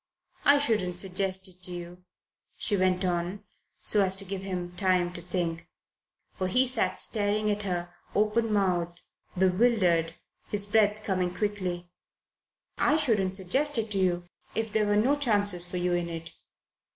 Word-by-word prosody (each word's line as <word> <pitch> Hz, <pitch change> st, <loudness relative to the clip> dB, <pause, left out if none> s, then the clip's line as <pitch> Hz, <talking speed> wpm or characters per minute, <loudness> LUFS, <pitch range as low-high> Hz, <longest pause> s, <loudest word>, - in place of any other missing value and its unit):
I 285 Hz, 0 st, +7 dB
shouldn't 215 Hz, -10 st, +1 dB
suggest 190 Hz, +1 st, +1 dB
it 185 Hz, -1 st, -13 dB
to 180 Hz, -, -1 dB
you," 175 Hz, +1 st, -8 dB, 0.5 s
she 205 Hz, -, +1 dB
went 185 Hz, -1 st, +1 dB
on, 175 Hz, +2 st, -2 dB, 0.4 s
so 205 Hz, -2 st, +4 dB
as 190 Hz, 0 st, +2 dB
to 195 Hz, +1 st, -4 dB
give 195 Hz, 0 st, -4 dB
him 180 Hz, -2 st, -4 dB
time 180 Hz, -2 st, +2 dB
to 175 Hz, -, -5 dB
think, 170 Hz, -1 st, -3 dB, 0.7 s
for 185 Hz, -, -2 dB
he 250 Hz, +8 st, +4 dB
sat 255 Hz, -2 st, 0 dB
staring 210 Hz, 0 st, +2 dB
at 205 Hz, 0 st, -1 dB
her, 175 Hz, -3 st, -3 dB, 0.2 s
openmouthed, 200 Hz, -6 st, 0 dB, 0.3 s
bewildered, 180 Hz, -4 st, +2 dB, 0.3 s
his 205 Hz, -1 st, -1 dB
breath 210 Hz, 0 st, +2 dB
coming 185 Hz, -3 st, -1 dB
quickly 185 Hz, -4 st, -3 dB, 0.9 s
"I 300 Hz, -, +3 dB
shouldn't 210 Hz, -11 st, +1 dB
suggest 260 Hz, +10 st, 0 dB
it 220 Hz, -1 st, -2 dB
to 195 Hz, -, 0 dB
you 175 Hz, -2 st, 0 dB, 0.3 s
if 220 Hz, -1 st, -2 dB
there 215 Hz, -1 st, +2 dB
were 205 Hz, -, +2 dB
no 255 Hz, +7 st, +3 dB
chances 205 Hz, -10 st, +2 dB
for 180 Hz, -, -5 dB
you 180 Hz, 0 st, 0 dB
in 175 Hz, -1 st, -1 dB
it. 165 Hz, 0 st, -5 dB
190 Hz, 155 wpm, -28 LUFS, 180-210 Hz, 0.9 s, I